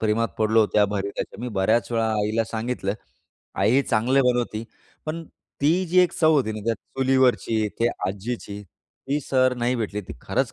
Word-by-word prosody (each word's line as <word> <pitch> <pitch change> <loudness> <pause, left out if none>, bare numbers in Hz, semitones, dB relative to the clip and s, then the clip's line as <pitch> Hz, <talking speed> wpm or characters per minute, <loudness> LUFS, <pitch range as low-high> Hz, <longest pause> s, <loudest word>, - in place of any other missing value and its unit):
प्रेमात 115 +1 +1
पडलो 110 0 +4
त्या 105 -1 +6
भरीताच्या 100 0 -4
मी 125 - -2
बऱ्याच 110 +6 +2
वेळा 115 -1 +1
आईला 110 +2 0
सांगितलं, 110 -3 -3 0.6
आई 115 +8 +3
चांगले 130 +5 +2
बनवती, 120 -3 0 0.4
पण 165 +1 -4 0.4
ती 170 +6 +3
जी 180 +2 +2
एक 180 - +1
चव 160 -1 +3
होती 130 -7 +2
ना, 110 - -6
त्या 115 0 +1
चुलीवरची, 130 -5 +1
त्या 120 +1 +2 0.2
आजीची, 105 0 -5
ती 140 - -6
सर 130 -1 +2
नाही 120 +1 0
भेटली. 105 -3 -3
ती 90 - -9
खरंच - - -1
115 Hz, 165 wpm, -24 LUFS, 105-130 Hz, 0.6 s, त्या